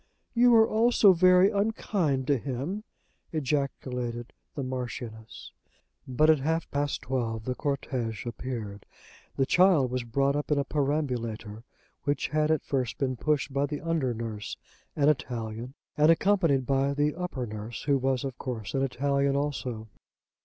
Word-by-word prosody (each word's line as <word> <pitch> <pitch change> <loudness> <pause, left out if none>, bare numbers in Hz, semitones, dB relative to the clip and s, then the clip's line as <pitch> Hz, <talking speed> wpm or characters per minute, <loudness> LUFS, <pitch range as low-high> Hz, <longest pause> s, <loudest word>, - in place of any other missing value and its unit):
"You 240 0 +5
are 220 0 +6
all 230 +3 +3
so 205 -5 +6
very 185 +2 +5
unkind 200 -9 0
to 140 -1 +2
him," 145 - -4 0.5
ejaculated 125 -5 -2 0.2
the 140 - -3
Marchioness. 120 -3 -6 0.6
But 130 +4 +3
at 155 - +3
half 160 +4 -1
past 145 0 -1
twelve 115 -4 -2
the 125 - -1
cortège 125 -6 -3
appeared. 115 -4 -6 0.5
The 135 - +2
child 175 -6 +4
was 125 -1 -1
brought 135 +4 +1
up 145 - -2
in 150 - +3
a 140 - +2
perambulator 125 -7 -2 0.4
which 145 0 -1
had 155 0 +1
at 160 -1 +1
first 130 -4 -1
been 130 -3 -1
pushed 145 0 0
by 140 +1 +1
the 150 -1 -4
under 165 -6 0
nurse, 110 -2 -5 0.4
an 145 -1 +2
Italian, 120 -3 -2 0.2
and 150 +1 +4
accompanied 165 -6 +3
by 135 +1 +1
the 145 +1 +1
upper 175 -8 -4
nurse, 110 +1 -7
who 140 -1 +2
was 130 -1 0
of 135 -2 -5
course 115 -6 -5
an 135 - 0
Italian 140 +1 +1
also. 130 -6 -3
135 Hz, 155 wpm, -28 LUFS, 125-150 Hz, 0.6 s, are